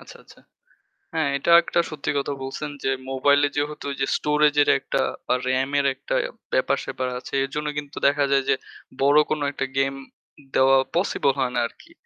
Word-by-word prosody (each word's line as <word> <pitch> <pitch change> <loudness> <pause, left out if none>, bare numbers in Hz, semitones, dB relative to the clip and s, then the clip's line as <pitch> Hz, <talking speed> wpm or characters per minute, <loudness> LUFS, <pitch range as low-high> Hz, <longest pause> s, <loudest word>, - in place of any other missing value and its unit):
আচ্ছা, - - -13
আচ্ছা। - - -19 0.8
হ্যাঁ, 160 -3 +1
এটা 155 - 0
একটা 170 - 0
সত্যি 150 -1 -3
কথা 140 +1 -1
বলছেন 135 +3 -5
যে 135 - +1 0.2
মোবাইলে 140 +2 +3
যেহেতু 145 0 -3 0.3
স্টোরেজের 150 -1 +3
একটা - - -1 0.3
বা - - +3
রামের 135 +2 +1
একটা - - -4 0.4
ব্যাপার-স্যাপার 315 - 0
আছে - - -12
এর 135 - -3
জন্য 150 0 -2
কিন্তু 145 -1 -6
দেখা 145 0 +2
যায় 135 -1 +3
যে - - +4 0.5
বড় 145 +2 +5
কোন 155 - 0
একটা 135 - -3
গেম 135 0 +2 0.6
দেওয়া 135 0 +5 0.2
possible 170 -6 +1
হয় 130 -2 0
না - - +2
আরকি। 335 - -20
140 Hz, 165 wpm, -23 LUFS, 135-150 Hz, 0.8 s, বড়